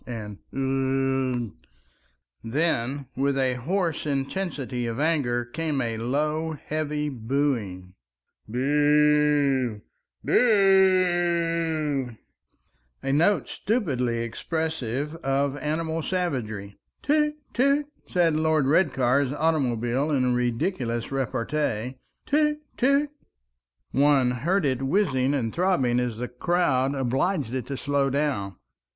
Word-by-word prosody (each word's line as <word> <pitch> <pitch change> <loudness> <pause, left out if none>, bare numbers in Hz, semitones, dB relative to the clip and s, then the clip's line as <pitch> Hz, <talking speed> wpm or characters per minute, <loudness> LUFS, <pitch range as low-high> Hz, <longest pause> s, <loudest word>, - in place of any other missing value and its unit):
and 105 -4 -6
"Ugh!" 135 -3 0 0.9
Then 140 0 -1
with 140 +1 0
a 130 -1 +2
hoarse 165 +5 -1
intensity 135 -3 -2
of 115 +2 -4
anger 140 -6 +1
came 150 +3 -2
a 115 -3 -1
low 150 +7 -1
heavy 150 0 -3
booing, 115 -8 -2 0.5
"Boo! 145 -2 +2 0.4
boo—oo!" 175 - +2 0.9
a 135 - -1
note 170 +8 +3
stupidly 125 - -1
expressive 150 +1 -3
of 140 -1 0
animal 160 +3 -2
savagery. 120 - -3 0.2
"Toot, 300 +1 +2 0.2
toot!" 280 +4 +2 0.2
said 170 -3 +2
Lord 155 -2 +2
Redcar's 135 -4 +2
automobile 135 -4 0
in 130 -4 +2
ridiculous 120 - -1
repartee. 130 -2 -2 0.3
"Toot, 300 +1 +2 0.2
toot!" 280 +3 +2 0.8
One 140 -3 +3
heard 165 +9 0
it 130 -2 0
whizzing 135 -3 +1
and 115 -5 -2
throbbing 170 -10 +2
as 120 -3 -2
the 125 +1 -3
crowd 135 -1 +1
obliged 135 - 0
it 130 -2 -3
to 140 - -4
slow 140 0 0
down. 135 -9 -1
140 Hz, 100 wpm, -25 LUFS, 125-160 Hz, 0.9 s, note